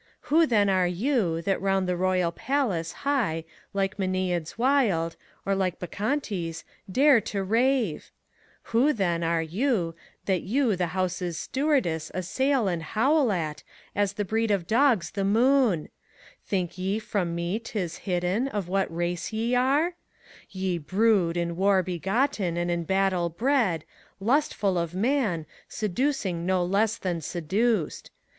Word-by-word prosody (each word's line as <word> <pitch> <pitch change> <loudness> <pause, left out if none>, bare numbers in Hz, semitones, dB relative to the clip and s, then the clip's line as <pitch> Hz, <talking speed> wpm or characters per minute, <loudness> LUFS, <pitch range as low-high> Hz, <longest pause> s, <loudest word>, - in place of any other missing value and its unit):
Who, 325 0 +6
then, 210 -5 +3
are 185 -2 +3
you, 180 - 0
that 195 +2 0
round 195 -1 +1
the 180 - 0
Royal 180 -1 +1
Palace 200 - -1
high 220 - 0 0.3
Like 195 0 -1
Mamads 185 -3 -1
wild, 230 -11 +2 0.3
or 195 - +1
like 190 -2 0
Bacchantes, 195 - -3 0.3
dare 270 +1 +5
to 200 -1 -3
ravet 230 - +1 0.6
Who, 265 +7 +4
then, 175 -6 0
are 165 0 +1
you, 180 - 0 0.3
that 185 -3 +1
you 235 +1 +1
the 180 -1 -1
House's 180 -2 -1
stewardess 255 - 0
Assail 255 +6 +1
and 175 -3 -1
hoid 255 - +2
at, 155 -5 -3 0.3
as 205 -1 +1
the 205 0 -2
breed 225 +3 0
of 195 -4 +1
dogs 225 - +2
the 200 - -3
moont 230 - +3 0.6
Think 185 -2 -2
ye 190 +3 0
from 200 -6 -2
me 170 +5 -1
't 230 -1 -7
is 175 -3 -3
hidden, 185 +6 -1
of 205 -8 -3
what 195 0 0
race 175 +3 -2
ye 225 +2 -1
areT 280 +8 +2 0.6
Ye 185 -2 -2
brood, 185 0 +2
in 170 0 -1
war 190 +1 +3
b^;otten 190 - -1
and 175 0 0
in 170 -1 -1
battle 190 -1 +1
bred, 220 - +1 0.3
Lustful 210 - +1
of 170 +1 -3
man, 210 - 0 0.2
seducing 210 -5 -1
no 185 0 +1
less 205 +4 +1
than 175 -3 -3
seduced. 185 +4 -1
195 Hz, 145 wpm, -26 LUFS, 175-230 Hz, 0.6 s, Who